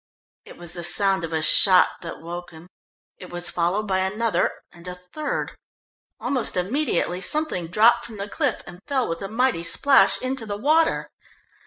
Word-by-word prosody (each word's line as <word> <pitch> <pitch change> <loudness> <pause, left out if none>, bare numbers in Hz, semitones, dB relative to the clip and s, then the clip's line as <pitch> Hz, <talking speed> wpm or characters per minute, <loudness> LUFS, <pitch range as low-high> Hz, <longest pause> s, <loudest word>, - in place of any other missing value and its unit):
It - - -13
was 175 -1 -9
the 175 - -6
sound 195 +1 +1
of 165 - -5
a 160 -1 -1
shot 180 +4 +4
that 165 - -8
woke 175 +2 -7
him. 160 +1 -14 0.5
It 180 - -10
was 175 0 0
followed 180 +5 -1
by 190 -1 0
another, 210 +4 0 0.2
and 170 +1 -15
a 180 - -5
third. 180 +13 -5 0.6
Almost 255 -8 0
immediately 185 - -1
something 245 - 0
dropped 215 +7 +4
from 220 -2 -10
the 200 0 -5
cliff, 270 +3 -2
and 175 0 -12
fell 265 -3 0
with 165 0 -4
a 195 - -4
mighty 230 -2 0
splash 270 +11 +4
into 255 -3 -3
the 205 -1 -4
water. 315 +7 +1
190 Hz, 175 wpm, -23 LUFS, 175-240 Hz, 0.6 s, shot